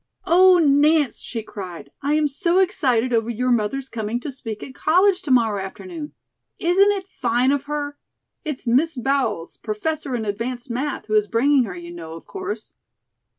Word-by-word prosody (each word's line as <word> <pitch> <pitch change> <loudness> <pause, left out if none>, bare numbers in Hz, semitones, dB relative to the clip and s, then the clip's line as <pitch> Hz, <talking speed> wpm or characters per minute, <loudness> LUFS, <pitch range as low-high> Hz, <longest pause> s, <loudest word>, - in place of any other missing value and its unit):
"Oh, 365 +2 +6
Nance," 295 -3 +3
she 225 -2 -5
cried, 185 -5 -8
"I 290 +2 +1
am 305 0 +2
so 340 +5 +1
excited 255 - +2
over 225 0 +1
your 250 +2 0
mother's 240 +4 0
coming 225 -1 -3
to 285 - -5
speak 225 -5 -7
at 260 - -9
college 365 +7 +3
to - - -7
morrow 225 -6 +3
afternoon. 310 - -8 0.4
Isn't 375 +4 +4
it 390 -2 -3
fine 245 -3 +1
of 285 0 0
her? 290 -1 -4 0.4
It's 295 -4 -5
Miss 270 +6 +2
Bowles, 245 -9 -1
Professor 265 +5 -3
in 225 -2 -2
Advanced 240 +5 -4
Math., 275 +5 -3
who 215 - -4
is 210 -1 +3
bringing 255 +3 +3
her, 190 -4 -6
you 175 0 -9
know, 165 -1 -8
of 165 - -11
course?" 390 +1 -6
260 Hz, 175 wpm, -22 LUFS, 225-310 Hz, 0.4 s, Oh